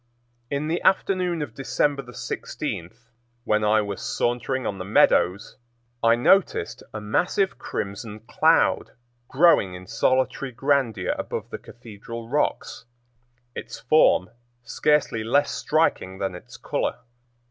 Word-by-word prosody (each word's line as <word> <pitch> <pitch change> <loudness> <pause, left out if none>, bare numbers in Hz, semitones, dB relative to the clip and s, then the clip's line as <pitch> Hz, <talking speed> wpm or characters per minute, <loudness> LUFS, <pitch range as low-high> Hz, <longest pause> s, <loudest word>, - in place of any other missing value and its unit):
In 140 +2 -2
the 165 +2 -1
afternoon 180 -4 +1
of 125 -7 -8
December 140 +1 -1
16, 85 -6 -5 0.5
when 105 -1 +1
I 105 +1 +3
was 100 -1 -5
sauntering 125 +2 -1
on 100 - -3
the - - -4
meadows, 95 -1 +2 0.5
I 115 0 +5
noticed 125 - +2
a 110 - -5
massive 180 - 0
crimson 105 +2 -5
cloud 115 - +2 0.3
growing 135 - +4
in 90 0 -10
solitary 130 +4 0
grandeur 135 -3 0
above - - -5
the - - -5
Cathedral 115 0 -10
Rocks, 150 +3 -2 0.7
its - - -8
form 120 -7 +3 0.3
scarcely 130 -2 +1
less 140 +6 +2
striking 150 - 0
than 95 -1 -3
its 90 - -11
color. - - -2
120 Hz, 120 wpm, -24 LUFS, 105-145 Hz, 0.7 s, I